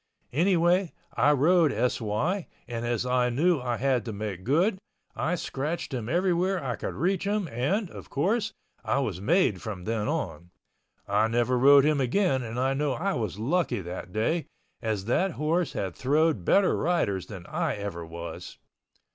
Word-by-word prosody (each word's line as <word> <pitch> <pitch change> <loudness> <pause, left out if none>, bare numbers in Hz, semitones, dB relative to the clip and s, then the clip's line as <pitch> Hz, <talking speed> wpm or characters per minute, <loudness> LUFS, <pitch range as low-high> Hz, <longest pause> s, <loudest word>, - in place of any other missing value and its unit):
Anyway 175 +2 +3 0.2
I 130 +6 +4
rode 155 +3 +4
S.Y. 125 - -1 0.2
and 120 -1 -4
as 120 0 -1
I 125 -1 +2
knew 155 +5 +2
I 120 -2 -1
had 130 0 +1
to 115 - -4
make 100 -3 -5
good, 180 - +2 0.4
I 165 +5 0
scratched 155 -1 -3
him 120 -3 -3
everywhere 180 +1 +1
I 125 -3 -2
could - - -5
reach 185 +5 0
him 205 -2 0
and, 175 - 0
of - - -10
course, 205 +9 0 0.3
I - - 0
was 105 -10 -2
made 140 - +2
from 100 -5 -6
then 110 +1 -1
on. 85 +3 -3 0.6
I 105 +2 +3
never 120 +2 +1
rode 140 +2 +7
him 150 -2 +2
again 135 +1 +2
and 120 0 -5
I 135 +1 +2
know 145 0 0
I 195 +7 -1
was 110 -5 -3
lucky 125 - 0
that 90 +1 -7
day, 140 - 0 0.3
as 110 -4 -2
that 175 - +1
horse 160 +3 0
had 95 -3 -3
throwed 150 - +2
better 200 -1 +4
riders 150 - 0
than 95 -4 -9
I - - -1
ever 100 -4 -5
was. 85 +1 -8
135 Hz, 170 wpm, -27 LUFS, 110-175 Hz, 0.6 s, rode